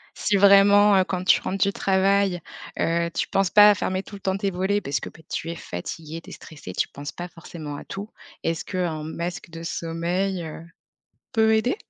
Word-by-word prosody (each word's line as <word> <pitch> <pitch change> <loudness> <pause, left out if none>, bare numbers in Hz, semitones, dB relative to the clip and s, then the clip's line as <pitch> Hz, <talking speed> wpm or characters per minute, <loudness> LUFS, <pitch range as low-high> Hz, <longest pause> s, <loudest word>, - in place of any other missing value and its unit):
Si 205 - 0
vraiment, 200 +1 +7
heu, 190 - +5
quand 185 -1 -3
tu 185 - +5
rentres 195 0 0
du 200 - +2
travail, 195 -1 +2 0.4
heu, 170 0 +1
tu - - -1
penses 195 -1 +2
pas 210 +2 +8
à - - +2
fermer 185 0 -2
tout 205 - -11
le 195 - -11
temps 190 0 0
tes 195 0 -1
volets 190 +3 0
parce 140 - -2
que, - - -7
beh 160 - -18
tu 165 - -3
es - - -5
fatigué, 160 - -6
tu - - -14
es - - -8
stressé, 145 - -10
tu - - 0
penses 145 +1 -7
pas 175 - -6
forcément 165 -3 -8
à - - -10
tout, 200 +3 -7 0.3
est-ce 165 -1 -2
qu'un 175 -5 -2
masque 170 +3 -5
de 165 0 -9
sommeil, 170 +3 -2
heu, 160 0 -8 0.7
peut 220 -1 +4
aider? 245 +9 +1
185 Hz, 210 wpm, -24 LUFS, 165-200 Hz, 0.7 s, pas